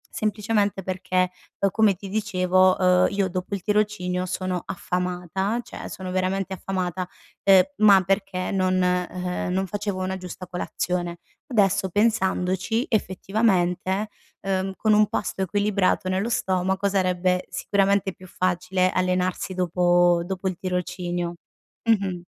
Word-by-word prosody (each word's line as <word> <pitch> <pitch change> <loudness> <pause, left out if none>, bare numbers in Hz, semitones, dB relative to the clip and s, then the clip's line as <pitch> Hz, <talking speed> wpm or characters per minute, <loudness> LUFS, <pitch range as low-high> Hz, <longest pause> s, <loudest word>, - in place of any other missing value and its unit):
semplicemente 210 -2 0
perché, 185 0 0 0.3
uhm, 200 - +3
come 215 -2 +3
ti 195 +2 -9
dicevo, 185 -2 +2
uhm, 180 -1 +4
io 195 -1 0
dopo 185 +3 -3
il 190 - -7
tirocinio 205 -4 0
sono 185 0 -2
affamata, 180 +4 -2
cioè - - -8
sono 185 -1 -6
veramente 190 +1 -1
affamata, 185 -1 -3 0.4
uhm, 195 -1 +8 0.2
ma 205 -2 +7
perché 195 -1 -1
non, 185 -1 +1
e 180 0 +1
ehm 180 0 -3
non 190 +1 0
facevo 205 -1 -3
una 190 0 -2
giusta 185 0 -8
colazione. 175 -1 -3 0.3
Adesso 200 - +2
pensandoci, 205 +2 +1
effettivamente, 190 -1 0 0.3
uhm, 195 0 -1
con 215 +1 +2
un 210 0 +5
pasto 195 - -3
equilibrato 200 -1 +1
nello 190 +5 0
stomaco 190 -2 0
sarebbe 185 -1 +1
sicuramente 195 +1 +1
più 185 - -14
facile 185 +1 0
allenarsi 185 0 0
dopo 175 -1 +3
dopo 190 +1 -3
il 185 -2 -2
tirocinio. 175 -1 -3 0.5
Mh-mh. 195 -5 +1
185 Hz, 130 wpm, -24 LUFS, 180-200 Hz, 0.5 s, uhm